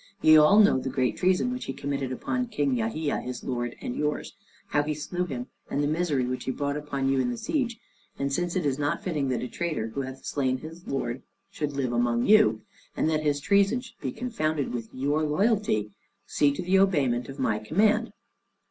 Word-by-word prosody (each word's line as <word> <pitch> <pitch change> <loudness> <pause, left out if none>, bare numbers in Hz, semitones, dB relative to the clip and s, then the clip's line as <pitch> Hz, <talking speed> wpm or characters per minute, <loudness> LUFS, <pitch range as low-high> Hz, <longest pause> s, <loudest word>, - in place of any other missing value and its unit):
Ye 155 - +7
all 155 +7 +7
know 205 -10 +6
the 130 - -3
great 130 -1 0
treason 185 +7 +2
which 250 - -5
he 135 - -4
committed 140 -1 -3
upon 250 - -2
King 145 - 0
Yahia, 125 +7 -1
his 125 -1 -6
lord 120 -2 -3
and 120 - -4
yours, 150 0 -2 0.4
how 145 - +2
he 150 +1 -2
slew 175 +4 -3
him, 125 -7 -5 0.2
and 145 - 0
the - - +2
misery 155 -4 0
which 125 +1 -3
he - - 0
brought 145 +2 -2
upon 145 -2 -2
you 135 0 +2
in 125 -1 +1
the 120 - -3
siege; 260 - -1 0.4
and 140 0 -1
since 175 +2 -1
it 180 -4 0
is 140 0 0
not 145 0 -1
fitting 150 -7 -1
that 125 - -1
a - - -3
traitor 155 -8 -3
who 140 +5 -3
hath 130 0 -8
slain 130 -2 0
his 160 +5 -11
lord 130 -2 -2 0.3
should 150 -2 -3
live 130 -3 -1
among 120 0 +1
you, 110 - +5 0.3
and 160 - +2
that 155 -1 +1
his 145 -1 +1
treason 200 - +3
should 250 -2 -13
be - - -2
confounded 160 - -2
with 115 -2 -4
your 145 +4 0
loyalty, 155 - +1 0.3
see 145 - +2
to 160 +6 -4
the 190 +2 +3
obeyment 135 -11 +2
of 135 - -8
my 110 -5 0
command." 200 - +2
145 Hz, 210 wpm, -27 LUFS, 130-175 Hz, 0.4 s, Ye